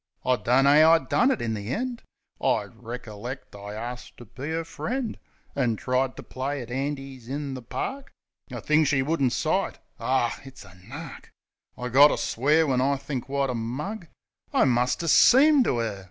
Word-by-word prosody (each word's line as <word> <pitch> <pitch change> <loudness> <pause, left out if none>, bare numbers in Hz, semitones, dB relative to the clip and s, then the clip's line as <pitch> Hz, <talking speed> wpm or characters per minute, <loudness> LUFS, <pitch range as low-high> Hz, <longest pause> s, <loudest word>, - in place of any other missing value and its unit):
I 130 - +3
dunno 130 +5 +3
'ow 160 +1 +7
I - - +7
done 245 +9 +1
it 265 - 0
in 115 -1 -1
the 105 0 -5
end. 245 - -3 0.4
I - - +2
reckerlect 120 +1 -8
I 100 +1 -8
arst 120 +3 -7
ter 120 - -11
be 130 +7 -7
'er 165 +1 -2
friend; 245 +8 -4 0.4
An' 125 -5 +1
tried 130 +3 -1
ter - - -8
play 135 +2 -4
at 120 - -11
'andies 135 -2 -4
in 140 0 -4
the 130 - -6
park, 270 - -5 0.4
A - - -6
thing 155 +1 +3
she 135 -2 +2
wouldn't 140 -3 +1
sight. - - 0 0.2
Aw, 130 -2 0
it's 135 -5 -12
a 95 - -15
nark! 135 - -10 0.5
I 125 0 -4
gotter 140 +4 +6
swear 150 +7 +2
when 130 -3 +1
I 140 +1 +2
think 135 -1 -5
wot 140 -1 0
a - - -3
mug 145 - -4 0.4
I - - +3
must 125 +4 +1
'a' - - -3
seemed 275 - +6
to 125 - +1
'er. 110 -4 -3
135 Hz, 185 wpm, -26 LUFS, 120-150 Hz, 0.5 s, ow